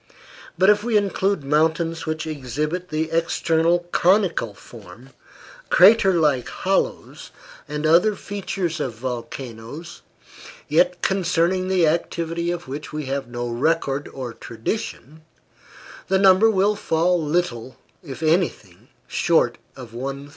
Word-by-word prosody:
But 190 +2 +6
if 210 0 +1
we 230 -2 +2
include 200 -4 0
mountains 160 +3 0
which 155 0 -3
exhibit 150 +4 -4
the 160 +1 -2
external 165 +1 +1
conical 175 - +2
form, 115 +4 -14 0.6
crater 195 -1 +6
like 150 -7 +2
hollows, - - -2 0.4
and 150 +1 -4
other 180 +7 +4
features 190 -5 -4
of 130 -6 -3
volcanoes, 120 +4 -7 0.7
yet 175 +4 +2
concerning 185 -1 +1
the 185 -3 +3
activity 170 +1 -1
of 175 -2 -4
which 145 +3 -7
we 150 -1 -4
have 135 -1 -3
no 120 0 -4
record 140 +3 0
or 125 -3 -7
tradition, 135 - -6 0.9
the 190 - +2
number 195 +3 +6
will 205 0 +2
fall 170 -2 +1
little, 145 -6 -2 0.2
if 150 -2 -8
anything, 130 - -1 0.2
short 160 -1 +1 0.2
of 125 -4 -11
1,000. 135 +3 -6
160 Hz, 120 wpm, -22 LUFS, 135-180 Hz, 0.9 s, But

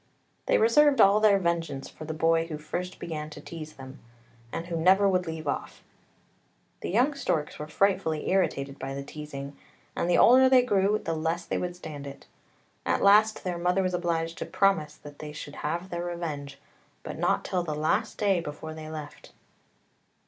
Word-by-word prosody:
They - - +4
reserved 275 +6 +5
all 200 +2 +6
their 215 -2 +5
vengeance 165 -6 -2
for 155 - -10
the 160 - -4
boy 165 +1 +2
who 155 -2 -5
first 175 +4 -5
began 155 -2 -5
to 150 - -10
teaze 155 0 -8
them, 135 +1 -11 0.5
and 165 - -4
who 170 -1 -4
never 190 +5 +4
would 185 -2 +1
leave 160 -1 -5
off. 140 - -4 1.0
The - - -5
young 250 +9 +3
storks 160 - -2
were 150 - -5
frightfully 175 -2 0
irritated 140 -7 0
by 135 0 -5
the 140 - -5
teazing, 140 -1 -8 0.4
and 170 - -1
the 175 - +4
older 260 +2 +7
they 255 -1 +6
grew 205 -3 +2
the 165 - -3
less 165 +2 -2
they - - -2
would 175 -1 -3
stand 150 -5 -8
it. 140 - -10 0.6
At - - 0
last 210 +2 +5
their 180 -2 -3
mother 180 +2 +1
was 185 0 -1
obliged 170 -1 -1
to - - -3
promise 160 -7 +1
that 145 -1 -13
they 150 -1 -7
should 145 -1 -8
have 170 +5 -3
their 175 0 -3
revenge, 150 -5 -5 0.5
but - - -7
not - - +1
till 180 - 0
the 155 -3 -3
last 160 +9 0
day 200 -3 +2
before 155 0 -7
they 155 0 -8
left. 155 -2 -9
165 Hz, 185 wpm, -27 LUFS, 150-190 Hz, 1.0 s, older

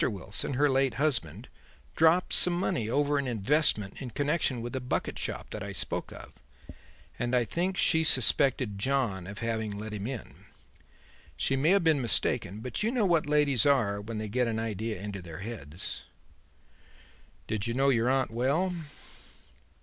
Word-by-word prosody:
Wilson, 100 +4 0
her 145 +3 +3
late 135 -3 +2
husband, 140 -3 -1 0.5
dropped 165 +3 +3
some 180 - +7
money 125 - -1
over 145 +3 +1
an 140 - -2
investment 115 -3 +1
in 130 - -5
connection 145 0 0
with 120 - -6
the 130 - -2
bucket 125 0 -3
shop - - -4
that - - -5
I - - -5
spoke - - -4
of, - - -11 0.9
and 120 +1 0
I 120 -1 +2
think 180 - -2
she 160 -1 +3
suspected 130 -6 +2
John 110 -7 0
of 100 +1 -8
having 110 -2 -2
let 105 +1 -6
him 105 +1 -4
in. 130 -3 -8 0.9
She 135 - +1
may 140 +4 +2
have 195 0 +4
been 160 -4 +3
mistaken, 110 -3 0
but 125 - -4
you 220 +2 +1
know 240 -5 +1
what 165 -5 +2
ladies 145 -5 +3
are 115 -8 +2
when 110 +2 -6
they 110 0 -4
get 125 +3 0
an 115 -1 -2
idea 110 -2 -3
into 100 -1 -6
their 85 -1 -9
heads." 95 -7 -6 1.4
"Did 110 -1 -3
you 115 - -2
know 135 +1 +3
your 120 -2 +2
aunt 130 -3 +1
well?" 140 +11 0
125 Hz, 170 wpm, -29 LUFS, 110-145 Hz, 1.4 s, some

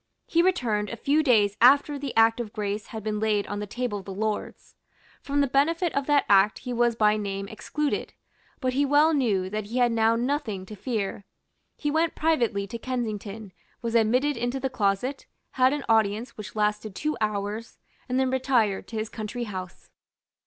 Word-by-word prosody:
He 335 - +2
returned 240 - +1
a - - -4
few 285 +7 +2
days 215 -8 +3
after 280 +3 +5
the 275 -2 -5
Act 225 +1 +5
of 220 -3 -5
Grace 210 0 -3
had 220 -3 -7
been 210 -1 -2
laid 210 -2 +1
on 205 - -4
the 210 - -4
table 235 -1 -3
of 190 - -12
the 195 - -7
Lords. 215 +1 -4 0.5
From 285 0 0
the 280 - +2
benefit 325 +6 +1
of 280 -1 -1
that 290 -1 +3
Act 200 +1 +5
he 250 -1 -5
was 240 -1 +2
by 215 -1 +3
name 200 -1 -4
excluded; 290 +8 -3 0.5
but 255 -1 -1
he 280 +2 +2
well 295 +3 +4
knew 215 -10 +1
that 215 0 -3
he 230 +5 -5
had 245 -1 +3
now 225 0 +3
nothing 235 -6 -2
to 215 - -9
fear. 205 -3 -3 0.5
He 295 - -1
went 320 +1 +1
privately 235 -11 +1
to 230 +4 -7
Kensington, 220 -5 -4 0.3
was 230 -1 -2
admitted 250 +5 +2
into 245 +3 -2
the 265 0 -2
closet, 240 +4 -1 0.2
had 255 0 +3
an 290 -1 -3
audience 220 +1 +1
which 210 0 -9
lasted 210 -1 -1
two 305 +6 -1
hours, 210 +1 -3 0.3
and 255 +1 +1
then 260 -1 +1
retired 250 -6 +1
to 230 - -9
his 215 +1 -2
country 220 +3 -5
house. 185 -5 -8
230 Hz, 190 wpm, -26 LUFS, 210-265 Hz, 0.5 s, after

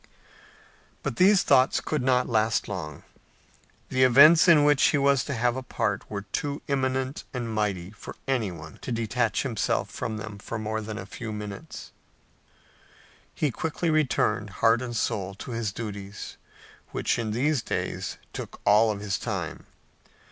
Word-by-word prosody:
But - - -3
these 195 +1 +5
thoughts 130 -2 +4
could 155 -3 -2
not 125 0 +2
last 110 -1 +1
long. 80 -7 -6 0.9
The 130 - 0
events 145 +7 +8
in 160 -4 +7
which 145 -2 +4
he 150 - +3
was 140 -1 +3
to 140 - -3
have 120 +1 +1
a 130 - -3
part 130 - -2
were 100 -1 -4
too 140 +8 -3
imminent 130 -1 -1
and 120 -2 -3
mighty 100 -4 -1
for 105 - -10
anyone 95 - -3
to - - -5
detach 115 -1 0
himself 120 -6 -1
from 110 -1 -4
them 110 -2 -7 0.2
more 110 0 -2
than 110 0 -6
a 95 - -6
few 110 +3 -7
minutes. 105 -2 -7 1.4
He 150 - 0
quickly 160 +5 -2
returned, 135 -8 +1 0.2
heart 115 +1 +5
and 120 -2 -5
soul, 100 -4 -1
to 125 - -8
his 115 -3 -2
duties, 100 -2 -7 0.5
which - - -1
in 115 -2 -2
these 130 +5 +1
days - - -3 0.2
took - - -7
all 105 +1 +5
his 100 -1 -3
time. - - -4
115 Hz, 150 wpm, -26 LUFS, 105-135 Hz, 1.4 s, events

